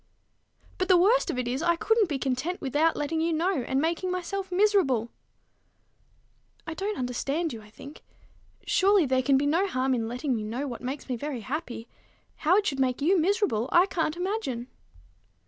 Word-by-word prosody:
"But 370 Hz, -, 0 dB
the 370 Hz, -, +6 dB
worst 435 Hz, +8 st, +3 dB
of -, -, -2 dB
it 250 Hz, -1 st, -2 dB
is, 255 Hz, +4 st, -2 dB
I 340 Hz, 0 st, +2 dB
couldn't 445 Hz, +2 st, +2 dB
be 290 Hz, -, -1 dB
content 270 Hz, +7 st, -2 dB
without 295 Hz, +5 st, +1 dB
letting 310 Hz, +2 st, -2 dB
you 335 Hz, +1 st, +1 dB
know, 340 Hz, +4 st, +1 dB
and 265 Hz, +3 st, -1 dB
making 335 Hz, +4 st, -1 dB
myself 370 Hz, +2 st, -4 dB
miserable." 360 Hz, -, +2 dB, 1.5 s
"I 320 Hz, -, -5 dB
don't 400 Hz, +5 st, -3 dB
understand 275 Hz, +6 st, -2 dB
you, 225 Hz, -, -8 dB
I 210 Hz, -, -16 dB
think. 280 Hz, +7 st, -12 dB, 0.6 s
Surely 390 Hz, -2 st, +4 dB
there 260 Hz, -1 st, +2 dB
can 270 Hz, +1 st, +3 dB
be 280 Hz, -, +1 dB
no 335 Hz, +7 st, +2 dB
harm 260 Hz, -6 st, 0 dB
in 230 Hz, -3 st, -1 dB
letting 250 Hz, +3 st, -2 dB
me 215 Hz, -, -3 dB
know 240 Hz, +7 st, -3 dB
what 240 Hz, -3 st, -6 dB
makes 265 Hz, +3 st, -5 dB
me 255 Hz, -, -2 dB
very 275 Hz, -1 st, -4 dB
happy! 250 Hz, -3 st, -5 dB, 0.5 s
How 340 Hz, +5 st, +3 dB
it 420 Hz, -, +1 dB
should 275 Hz, -7 st, -1 dB
make 255 Hz, -2 st, +1 dB
you 350 Hz, +6 st, +3 dB
miserable, 345 Hz, -, +1 dB
I 350 Hz, +2 st, +6 dB
can't 330 Hz, -4 st, -2 dB
imagine." 355 Hz, -, -3 dB
305 Hz, 185 wpm, -27 LUFS, 255-365 Hz, 1.5 s, the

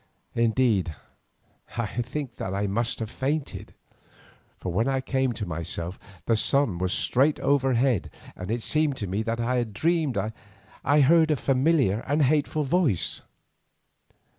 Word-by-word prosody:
Indeed, 115 Hz, -, +2 dB, 0.8 s
I 120 Hz, -, 0 dB, 0.2 s
think 130 Hz, 0 st, -5 dB
that 95 Hz, 0 st, -3 dB
I 100 Hz, +1 st, 0 dB
must 115 Hz, +4 st, -1 dB
have 110 Hz, -2 st, -4 dB
fainted, 140 Hz, +2 st, -3 dB, 0.8 s
for 90 Hz, -, -4 dB
when 110 Hz, +7 st, +1 dB
I 135 Hz, -1 st, +1 dB
came 130 Hz, -1 st, 0 dB
to 105 Hz, -, -4 dB
myself 85 Hz, +1 st, -4 dB, 0.3 s
the 115 Hz, -, +3 dB
sun 110 Hz, -5 st, +1 dB
was 90 Hz, 0 st, 0 dB
straight 140 Hz, +9 st, +2 dB
overhead, 130 Hz, -5 st, +2 dB, 0.3 s
and 90 Hz, -, -7 dB
it 115 Hz, +1 st, -1 dB
seemed 155 Hz, -3 st, +1 dB
to 105 Hz, -, -3 dB
me 95 Hz, +3 st, -2 dB
that 115 Hz, +1 st, -2 dB
I 125 Hz, +2 st, 0 dB
had 120 Hz, -4 st, -2 dB
dreamed 155 Hz, 0 st, +1 dB, 0.7 s
I 145 Hz, +2 st, +4 dB
heard 160 Hz, +3 st, +5 dB
a 155 Hz, -, +3 dB
familiar 135 Hz, -, +2 dB
and 145 Hz, +2 st, +2 dB
hateful 150 Hz, +2 st, +1 dB
voice. 145 Hz, -, +1 dB
125 Hz, 145 wpm, -26 LUFS, 105-145 Hz, 0.8 s, heard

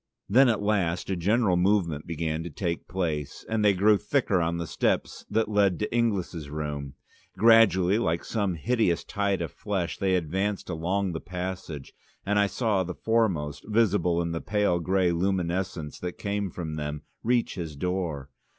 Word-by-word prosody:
Then 125 Hz, +5 st, +6 dB
at 110 Hz, -3 st, 0 dB
last 95 Hz, -4 st, 0 dB
a -, -, +1 dB
general 100 Hz, +1 st, +2 dB
movement 90 Hz, -5 st, +1 dB
began 80 Hz, -1 st, -2 dB
to 85 Hz, -, -5 dB
take 85 Hz, +1 st, -3 dB
place, 80 Hz, -6 st, -3 dB
and 110 Hz, -1 st, 0 dB
they 100 Hz, -2 st, +5 dB
grew 105 Hz, +2 st, +4 dB
thicker 110 Hz, -10 st, +1 dB
on 85 Hz, 0 st, 0 dB
the 85 Hz, -, -3 dB
steps -, -, -1 dB
that 110 Hz, +1 st, +1 dB
led 100 Hz, -3 st, +2 dB
to 105 Hz, +2 st, -3 dB
Inglis' 95 Hz, -9 st, 0 dB
room. 75 Hz, -2 st, -4 dB, 0.4 s
Gradually, 105 Hz, -4 st, +5 dB
like 85 Hz, -6 st, -1 dB
some 100 Hz, -5 st, -1 dB
hideous 105 Hz, -, +1 dB
tide 100 Hz, -3 st, -1 dB
of 80 Hz, -, -5 dB
flesh, 95 Hz, -5 st, -3 dB
they 95 Hz, -1 st, +2 dB
advanced 95 Hz, +4 st, -1 dB
along 90 Hz, +4 st, -1 dB
the 80 Hz, -, -5 dB
passage, 90 Hz, -6 st, -6 dB, 0.3 s
and 105 Hz, +1 st, +2 dB
I 100 Hz, -, +4 dB
saw 105 Hz, -3 st, 0 dB
the 90 Hz, 0 st, -6 dB
foremost, 90 Hz, -11 st, 0 dB
visible 95 Hz, -6 st, +2 dB
by 85 Hz, -, -3 dB
the 80 Hz, -, -3 dB
pale 105 Hz, -4 st, +1 dB
grey 90 Hz, 0 st, +2 dB
luminousness 90 Hz, -3 st, -1 dB
that 90 Hz, -1 st, -5 dB
came 100 Hz, -1 st, -2 dB
from 80 Hz, -3 st, -5 dB
them, 75 Hz, 0 st, -4 dB, 0.2 s
reach 120 Hz, 0 st, +1 dB
his 80 Hz, -5 st, -5 dB
door. 85 Hz, -4 st, -3 dB
90 Hz, 170 wpm, -27 LUFS, 85-105 Hz, 0.4 s, Then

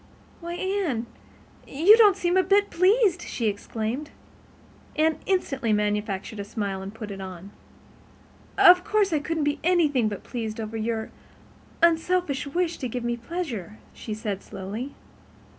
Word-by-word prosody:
"Why, 340 Hz, 0 st, -6 dB
Anne, 365 Hz, -, -1 dB, 0.6 s
you 340 Hz, +10 st, +6 dB
don't 420 Hz, -4 st, +6 dB
seem 355 Hz, -1 st, 0 dB
a 375 Hz, -, +6 dB
bit 400 Hz, +2 st, +2 dB
pleased!" 375 Hz, 0 st, +3 dB
she 235 Hz, -, -4 dB
exclaimed. 220 Hz, +6 st, -3 dB, 0.9 s
Anne 315 Hz, +1 st, +2 dB
instantly 275 Hz, -, 0 dB
manufactured 210 Hz, 0 st, -1 dB
a -, -, -2 dB
smile 200 Hz, -2 st, -4 dB
and 195 Hz, +1 st, -6 dB
put 215 Hz, -1 st, -8 dB
it 195 Hz, -1 st, -7 dB
on. 185 Hz, +1 st, -8 dB, 1.1 s
"Of 360 Hz, 0 st, +8 dB
course 410 Hz, -3 st, +1 dB
I 305 Hz, -, +2 dB
couldn't 320 Hz, +1 st, -2 dB
be 290 Hz, +1 st, 0 dB
anything 300 Hz, -10 st, +3 dB
but 205 Hz, -, -7 dB
pleased 225 Hz, -3 st, -5 dB
over 220 Hz, 0 st, -5 dB
your 220 Hz, 0 st, -2 dB, 0.7 s
unselfish 335 Hz, -3 st, +2 dB
wish 340 Hz, +3 st, -1 dB
to 255 Hz, -, -2 dB
give 245 Hz, +1 st, -4 dB
me 240 Hz, 0 st, -1 dB
pleasure," 235 Hz, -, -5 dB, 0.2 s
she 215 Hz, -, -6 dB
said 210 Hz, -3 st, -4 dB
slowly. 205 Hz, +8 st, -6 dB
265 Hz, 145 wpm, -25 LUFS, 215-350 Hz, 1.1 s, Of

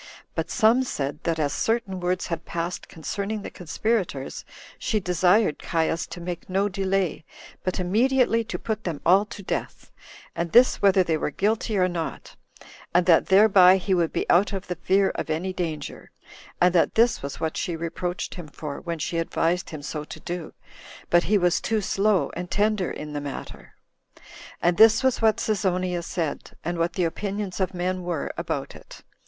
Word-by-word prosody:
But -, -, -3 dB
some 235 Hz, +2 st, +4 dB
said, 145 Hz, -, -3 dB
that 165 Hz, -2 st, 0 dB
as 145 Hz, -3 st, 0 dB
certain 225 Hz, -5 st, -1 dB
words 180 Hz, +1 st, -1 dB
had 170 Hz, -1 st, -4 dB
passed 170 Hz, +1 st, -4 dB
concerning 200 Hz, +6 st, -4 dB
the -, -, -7 dB
conspirators, 180 Hz, -, -2 dB, 0.4 s
she 220 Hz, -4 st, 0 dB
desired 180 Hz, 0 st, +2 dB
Caius 165 Hz, 0 st, -1 dB
to -, -, -8 dB
make 175 Hz, +1 st, -6 dB
no 195 Hz, +2 st, +1 dB
delay, 195 Hz, -4 st, -1 dB, 0.4 s
but 185 Hz, 0 st, -2 dB
immediately 230 Hz, +5 st, +2 dB
to -, -, -4 dB
put 220 Hz, -1 st, -4 dB
them 165 Hz, -5 st, -3 dB
all 190 Hz, +4 st, +5 dB
to 205 Hz, -1 st, -10 dB
death, -, -, -4 dB, 0.4 s
and 170 Hz, -1 st, -3 dB
this 245 Hz, +2 st, +6 dB
whether 195 Hz, -2 st, +5 dB
they 165 Hz, -3 st, 0 dB
were 150 Hz, -, -1 dB
guilty 210 Hz, +5 st, 0 dB
or 185 Hz, -1 st, +3 dB
not, 170 Hz, -3 st, -5 dB, 0.6 s
and 175 Hz, 0 st, +5 dB
that 170 Hz, -3 st, +5 dB
thereby 190 Hz, -2 st, +7 dB
he 190 Hz, +1 st, -1 dB
would 170 Hz, -3 st, +2 dB
be -, -, -2 dB
out 195 Hz, +4 st, +4 dB
of 190 Hz, -1 st, -4 dB
the 180 Hz, -, -4 dB
fear 190 Hz, +3 st, +2 dB
of -, -, -4 dB
any 175 Hz, +4 st, -2 dB
danger; 160 Hz, -5 st, -5 dB, 0.5 s
and 180 Hz, 0 st, +4 dB
that 175 Hz, -, +2 dB
this 230 Hz, +1 st, +3 dB
was 140 Hz, 0 st, -6 dB
what 160 Hz, -1 st, -2 dB
she 175 Hz, -, -2 dB
reproached 170 Hz, +2 st, -4 dB
him 175 Hz, -4 st, -8 dB
for, 150 Hz, -1 st, -7 dB
when 170 Hz, -1 st, -4 dB
she 165 Hz, +2 st, -2 dB
advised 165 Hz, +2 st, 0 dB
him 155 Hz, -3 st, -8 dB
so 150 Hz, +1 st, -4 dB
to -, -, -10 dB
do, 175 Hz, -2 st, -5 dB, 0.6 s
but 175 Hz, 0 st, +4 dB
he 210 Hz, -, +3 dB
was 180 Hz, -2 st, +2 dB
too 220 Hz, -1 st, 0 dB
slow 200 Hz, -1 st, +1 dB
and 180 Hz, +1 st, -5 dB
tender 210 Hz, -2 st, +1 dB
in 150 Hz, 0 st, -7 dB
the 145 Hz, -, -3 dB
matter. 145 Hz, -1 st, -8 dB, 0.9 s
And 175 Hz, 0 st, +3 dB
this 225 Hz, +2 st, +7 dB
was 260 Hz, -3 st, +2 dB
what 220 Hz, -1 st, +4 dB
Cesonia 185 Hz, -4 st, 0 dB
said, 165 Hz, -3 st, -4 dB
and 175 Hz, 0 st, -2 dB
what 170 Hz, +1 st, 0 dB
the 185 Hz, -, 0 dB
opinions 195 Hz, +3 st, -3 dB
of 190 Hz, 0 st, -1 dB
men 185 Hz, +1 st, -1 dB
were 175 Hz, -4 st, -3 dB
about -, -, -3 dB
it. -, -, -13 dB
180 Hz, 180 wpm, -25 LUFS, 170-200 Hz, 0.9 s, thereby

